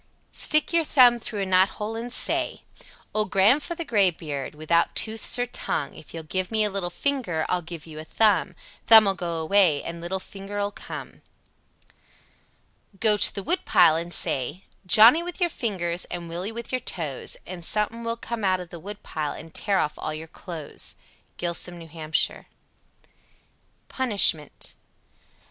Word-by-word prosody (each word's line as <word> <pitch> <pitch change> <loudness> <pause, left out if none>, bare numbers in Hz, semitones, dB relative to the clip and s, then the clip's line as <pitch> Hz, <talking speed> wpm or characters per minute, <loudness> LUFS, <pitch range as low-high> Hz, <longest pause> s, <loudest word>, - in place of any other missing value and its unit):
Stick 305 +3 +2
your 335 -1 +4
thumb 250 -5 +5
through 210 -3 -4
a - - -2
knothole 190 +4 +1
and 235 +2 -5
say: - - +1 0.5
Old 215 -1 0
Gran'f'ther 280 - +2
Graybeard, 165 - -1
without 155 +2 +1
tooths 220 +2 +2
or 245 - 0
tongue, 155 - -4
If - - -13
you'll 165 -1 -7
give 185 +4 -3
me 220 -1 +2
a 210 - +1
little 190 -3 -2
finger 185 - -1
I'll 180 - 0
give 170 -2 -9
you 155 -2 -10
a - - -6
thumb. 195 0 +1 0.3
Thumb'll 220 -3 +8
go 175 -3 -4
away 160 -2 +3
and 170 0 -7
little 175 +3 -3
finger'll 200 +1 -5
come. - - -9 1.8
88. - - -36
Go 215 -2 +4
to - - +3
the 200 - -4
woodpile 350 - +3
and 170 +1 -3
say, 150 +2 +1 0.2
"Johnnie 220 - +8
with 350 0 -6
your 350 -2 +1
fingers, 180 - -3
and 175 -1 -6
Willie 175 +5 -4
with 235 0 -7
your 255 -1 -1
toes," 155 - -3
and 180 -1 -8
something 210 +5 0
(suthin) - - -8
will 230 0 -3
come 235 -1 -6
out 185 -1 +2
of 180 -1 -8
the 170 - -9
woodpile 160 -6 -5
and 165 - -11
tear 200 -2 0
off 150 -4 -1
all 155 - -4
your 160 +1 -8
clothes 165 -2 -7 0.4
(close). 170 -1 -2
Gilsum, 175 -1 -10
N.H. 160 -1 -1 1.6
PUNISHMENT. 200 - +2
190 Hz, 160 wpm, -25 LUFS, 165-220 Hz, 1.8 s, Thumb'll